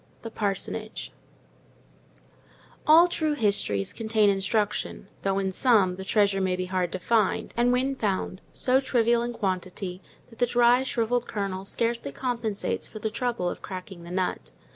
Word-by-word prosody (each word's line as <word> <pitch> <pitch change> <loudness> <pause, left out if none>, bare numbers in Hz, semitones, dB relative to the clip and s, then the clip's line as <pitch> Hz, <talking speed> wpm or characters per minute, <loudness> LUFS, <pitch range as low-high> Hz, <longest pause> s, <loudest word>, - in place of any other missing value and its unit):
THE 225 - -6
PARSONAGE 215 +1 -3 1.8
All 325 +3 +8
true 315 -3 0
histories 200 - 0
contain 220 -2 +2
instruction; 200 +1 -1
though, 195 0 0
in 190 -1 0
some, 200 -4 +3
the 190 - -7
treasure 200 -1 +2
may 185 -1 +1
be 185 0 -3
hard 185 -2 -1
to - - -1
find, 215 +1 +1
and 240 +1 +3
when 260 +2 +1
found, 195 -4 -2
so 255 +1 +3
trivial 235 -3 +2
in 240 0 -2
quantity, 185 -3 -3 0.3
that 230 - -16
the 245 - +3
dry, 240 +1 +4
shrivelled 245 -2 0
kernel 195 -2 -3
scarcely 230 -6 -1
compensates 230 - -2
for - - -10
the 215 0 -3
trouble 235 -5 -1
of - - -4
cracking 185 -1 -8
the 170 - -10
nut. 185 0 -2
215 Hz, 155 wpm, -26 LUFS, 190-240 Hz, 1.8 s, All